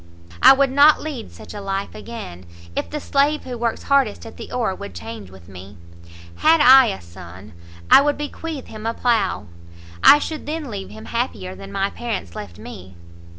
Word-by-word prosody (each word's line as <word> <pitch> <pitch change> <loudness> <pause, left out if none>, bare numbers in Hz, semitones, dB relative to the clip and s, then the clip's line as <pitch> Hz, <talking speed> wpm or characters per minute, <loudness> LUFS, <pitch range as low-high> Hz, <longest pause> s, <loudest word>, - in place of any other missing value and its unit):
I - - +9
would 270 -1 +2
not 285 +3 +6
lead 285 -7 -7
such - - -12
a 205 - -7
life 195 0 -4
again, 90 - -9 0.3
if - - -3
the 300 - -4
slave 285 +2 +1
who 250 - -6
works 235 -1 -2
hardest 275 -8 +1
at 225 - -11
the - - -10
oar 230 -6 -1
would 95 - -9
change 105 +2 -8
with 95 -2 -16
me. 95 +1 -12 0.6
Had 320 +1 +4
I 265 -2 +8
a 95 - -3
son, 90 +3 -13 0.4
I - - +9
would 290 +1 0
bequeath 295 0 -6
him 215 0 -8
a 230 - -2
plough; 230 -5 0 0.6
I - - +9
should 305 +1 -5
then 305 -4 -4
leave 195 -2 -6
him 220 +1 -11
happier 100 - -3
than 95 +1 -11
my 195 - -1
parents 225 - -5
left 90 -5 -8
me. 95 0 -11
225 Hz, 190 wpm, -21 LUFS, -, 0.6 s, I